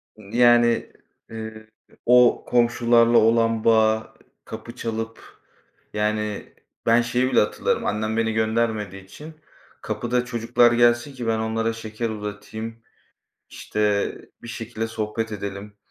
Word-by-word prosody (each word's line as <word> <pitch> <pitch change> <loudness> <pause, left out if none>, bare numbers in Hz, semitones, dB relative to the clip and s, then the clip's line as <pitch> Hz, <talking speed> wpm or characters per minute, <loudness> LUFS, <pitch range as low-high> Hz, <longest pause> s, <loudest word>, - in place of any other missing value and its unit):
Yani, 120 +2 +3 0.4
eee, 110 -1 -8 0.4
o 125 0 +5
komşularla 120 -1 +3
olan 115 0 +3
bağı, 110 -1 +2 0.3
kapı - - -9
çalıp 115 0 -4 0.7
yani, 105 0 -2 0.3
ben 115 +1 +5
şeyi 125 +2 0
bile - - +4
hatırlarım, 105 - 0
annem 110 +2 -1
beni 110 -1 +1
göndermediği 110 -3 -1
için 150 +11 -12 0.5
kapıda 120 +1 -2
çocuklar 120 0 +2
gelsin 120 +3 +3
ki 125 -3 -6
ben 110 -1 +1
onlara 115 +1 -1
şeker 115 0 -5
uzatayım, 110 +1 -6 0.7
işte, 105 -1 -1 0.3
bir 120 - -10
şekilde 115 -1 -5
sohbet 110 0 -4
edelim 100 0 -6
115 Hz, 115 wpm, -23 LUFS, 110-120 Hz, 0.7 s, o